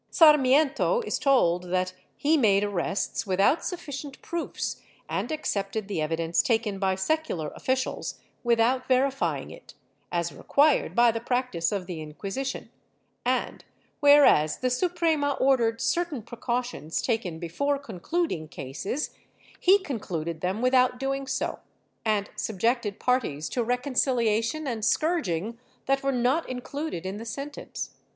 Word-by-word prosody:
Sarmiento 300 - +5
is 450 - -2
told 180 -11 +3
that 185 +1 -1 0.2
he 305 +3 +3
made 205 -8 +4
arrests 200 +2 -2
without 195 - +3
sufficient 285 -5 -6
proofs 340 -1 -4 0.3
and - - -2
accepted 215 -8 -2
the 195 -6 -2
evidence 165 +2 +1
taken 220 -4 0
by 190 -1 +1
secular 190 - -1
officials 260 0 -2 0.2
without 240 +2 +2
verifying 270 +1 +1
it, - - -13 0.4
as 170 -1 -1
required 290 0 +2
by 240 -1 +6
the 230 - -3
practice 240 -8 -1
of 200 -3 -2
the 175 -3 -6
Inquisition, 195 - -5 0.5
and, - - -1 0.4
whereas 285 - +6
the 255 0 -1
Suprema 320 -1 +1
ordered 240 -5 +2
certain 340 -8 -1
precautions 235 - -3
taken 220 -9 -1
before 280 - -1
concluding 260 - -3
cases, 155 - -4 0.5
he 380 +2 +6
concluded 170 - -4
them 190 +6 -1
without 255 -1 +3
doing 270 0 -2
so, 265 - -2 0.4
and 210 -2 0
subjected 220 0 -1
parties 230 - 0
to 245 - -1
rec 245 +2 -1
onciliation 245 +1 +1
and 230 -4 -3
scourging 235 - 0 0.3
that 275 0 +1
were 275 - +1
not 255 +6 +1
included 255 - -4
in 190 +2 -4
the 220 - -6
sentence. 275 +5 -6
240 Hz, 130 wpm, -27 LUFS, 195-275 Hz, 0.5 s, by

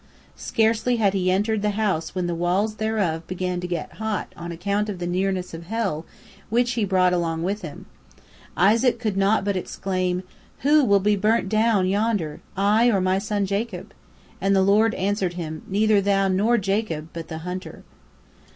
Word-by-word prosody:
Scarcely 225 +2 +1
had 205 -4 +2
he 185 -2 +1
entered 205 +3 +1
the 210 - +1
house 190 -6 -1
when 180 -1 -1
the 175 - -1
walls 185 +6 0
thereof 200 -7 -1
began 180 0 -2
to 180 - -4
get 175 -3 -5
hot 220 -3 -3
on 170 0 -7
account 200 +5 -1
of 200 - -4
the 175 - -4
nearness 185 0 -1
of 165 +1 -8
hell, 195 -8 -2 0.4
which 240 +2 +2
he 230 -3 0
brought 185 -2 +3
along 165 -2 -1
with 200 +4 -2
him. 155 -5 -8 0.7
Isaac 225 +8 +4
could 215 -4 -2
not 195 +1 +2
but 200 -1 0
exclaim, 185 0 -2 0.4
"Who 295 +2 +5
will 200 -5 +4
be 210 +1 +3
burnt 210 0 +1
down 215 -2 +2
yonder, 200 -6 -1 0.2
I 210 +4 +4
or 200 -5 +2
my 185 +1 +1
son 205 0 -1
Jacob?" 200 +4 -4 0.5
and 195 0 +2
the 190 - +4
Lord 215 +3 +3
answered 190 -2 -1
him, 160 -3 -5
"Neither 210 +1 +3
thou 195 0 +2
nor 205 +6 +2
Jacob, 195 -6 -2
but 165 -1 -6
the 160 - -6
hunter." 180 +1 -6
195 Hz, 180 wpm, -23 LUFS, 180-215 Hz, 0.7 s, Who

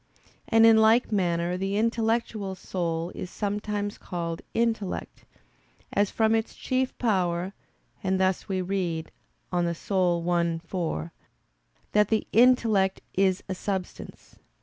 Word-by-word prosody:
And 225 -1 +5
in 225 -1 +7
like 220 +3 +4
manner 175 -3 0
the 195 +2 -1
intellectual 225 -3 0
soul 170 -2 -3
is 180 - -6
sometimes 205 0 -3
called 170 -2 -4
intellect, 225 -4 -2 0.7
as 205 -1 +2
from 220 0 +2
its 225 0 -1
chief 255 0 -1
power; 185 -4 0 0.5
and 190 0 +1
thus 190 0 0
we 190 -1 0
read 175 -4 -2 0.4
(De 180 - 0
Anima 175 -1 +1
i, 175 -2 +1
4), 160 - -3 0.8
that 210 -1 +4
the 220 0 +1
"intellect 225 -5 +4
is 190 0 +2
a 190 - -2
substance." 190 0 -6
190 Hz, 125 wpm, -27 LUFS, 175-220 Hz, 0.8 s, in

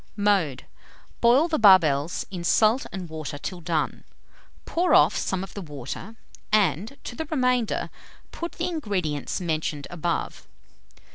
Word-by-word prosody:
Mode 195 -10 +1 0.6
Boil 250 +7 +5
the 320 -2 0
barbels 170 -7 +5
in 180 -3 -5
salt 220 +7 +3
and 185 -2 -6
water 155 -2 -6
till 175 +4 -6
done; 160 -2 -2 0.6
pour 355 +2 +2
off - - +5
some 190 -1 -1
of 195 - -9
the 200 - -6
water, 150 - -7 0.4
and, 210 - +1
to 240 - -7
the 320 - -4
remainder, 250 -6 0 0.4
put 340 0 -5
the 340 - -3
ingredients 195 - -2
mentioned 155 -4 -2
above. 175 -1 -3
190 Hz, 135 wpm, -25 LUFS, 160-235 Hz, 0.6 s, Boil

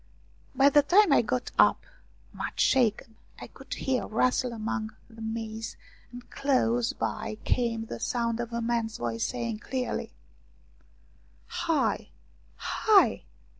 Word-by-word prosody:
By 275 +2 +5
the 290 - +6
time 365 +3 +5
I - - +6
got 240 +2 -2
up, - - +5 0.5
much - - -5
shaken, 225 -3 +2 0.2
I - - -7
could - - -16
hear 260 -2 -1
a - - -8
rustle 250 +2 +1
among 225 -1 -4
the 225 -1 -14
maize, 220 0 -5 0.3
and 245 0 -11
close 245 -4 +1
by 215 -1 -4
came 230 -2 0
the - - -7
sound 235 -2 -1
of 240 0 -4
a 235 0 -2
man's 230 -1 -1
voice 115 -1 -2
saying 235 -3 -3
clearly: 255 +2 -3 0.8
" 345 - -11
Hi! 325 -2 +1 0.5
Hi 425 -3 +3
235 Hz, 135 wpm, -28 LUFS, 225-255 Hz, 0.8 s, the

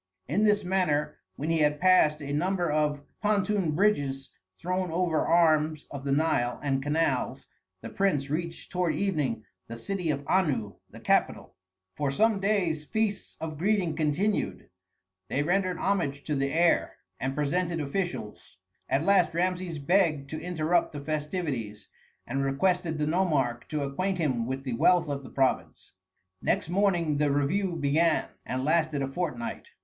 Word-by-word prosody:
In 200 +10 +2
this 210 -1 +3
manner 155 -5 0 0.2
when 155 +4 -2
he 165 - +2
had 150 -1 +2
passed 160 -4 +4
a 140 0 -4
number 175 +1 0
of 150 -1 0 0.2
pontoon 205 -5 +1
bridges 140 -9 +1 0.3
thrown 185 +1 -2
over 165 -1 0
arms 155 -2 +3
of 140 -1 -6
the 140 - -1
Nile 135 -5 +1
and 135 -2 0
canals, 145 -2 0 0.4
the - - -7
prince 170 -9 0
reached 165 +3 -4
toward 180 -2 0
evening 150 - -1 0.2
the 115 - -7
city 180 +7 -3
of 140 -1 -1
Anu, 140 - +1 0.2
the - - -12
capital. - - 0 0.4
For 145 -2 -1
some 215 +8 +2
days 190 -6 0
feasts 215 +4 -2
of 155 -2 -5
greeting 185 -4 +1
continued; 165 - -1 0.6
they 140 - 0
rendered 185 +2 +1
homage 155 -8 -1
to 150 - -2
the 140 0 0
heir, 170 +1 +2 0.2
and 135 +1 -2
presented 170 +4 0
officials. 145 - -4 0.3
At 135 +4 +1
last 190 -4 +3
Rameses 180 -1 -1
begged 155 -3 +1
to 155 - -4
interrupt 170 -1 0
the 145 - -5
festivities, 145 - -4 0.4
and 135 +3 -2
requested 165 +4 0
the 150 - 0
nomarch 150 -8 0
to 150 -2 -2
acquaint 185 +8 -1
him 130 -9 0
with 130 +1 -3
the 130 -3 -3
wealth 175 +9 +3
of 140 -1 -3
the 130 - -10
province. 135 -1 -1 0.5
Next - - 0
morning 175 -5 +1
the 150 0 +2
review 170 +7 0
began, 160 +2 +2 0.2
and 130 +1 -2
lasted 155 -2 +1
a - - -1
fortnight. 180 - -4
155 Hz, 155 wpm, -28 LUFS, 140-180 Hz, 0.6 s, passed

